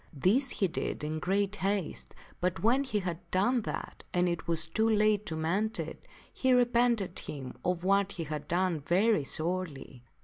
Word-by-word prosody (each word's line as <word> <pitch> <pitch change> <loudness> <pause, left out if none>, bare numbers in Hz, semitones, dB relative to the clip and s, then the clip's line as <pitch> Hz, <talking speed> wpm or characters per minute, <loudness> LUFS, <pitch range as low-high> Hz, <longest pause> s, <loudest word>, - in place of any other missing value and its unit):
This 205 - +2
he 195 - +1
did 165 -2 -3
in 155 +1 -2
great 200 +3 0
haste, 195 -3 -2 0.2
but 180 +1 -1
when 250 +5 +4
he 215 -6 -1
had 175 -3 -3
done 220 +8 +2
that - - -6
and 180 0 +3
it 170 -1 -2
was 165 -1 +2
too 220 +7 +1
late 215 -1 +3
to 160 - -3
mend 190 +8 0
it, - - -6 0.3
he 260 -1 +2
repented 240 -6 +2
him 135 -4 -6
of 180 -1 -1
what 195 +1 +2
he 170 - -3
had 150 -1 -5
done 175 -1 +1
very 180 +5 +2
sorely. 155 -5 -2
185 Hz, 175 wpm, -30 LUFS, 165-215 Hz, 0.3 s, when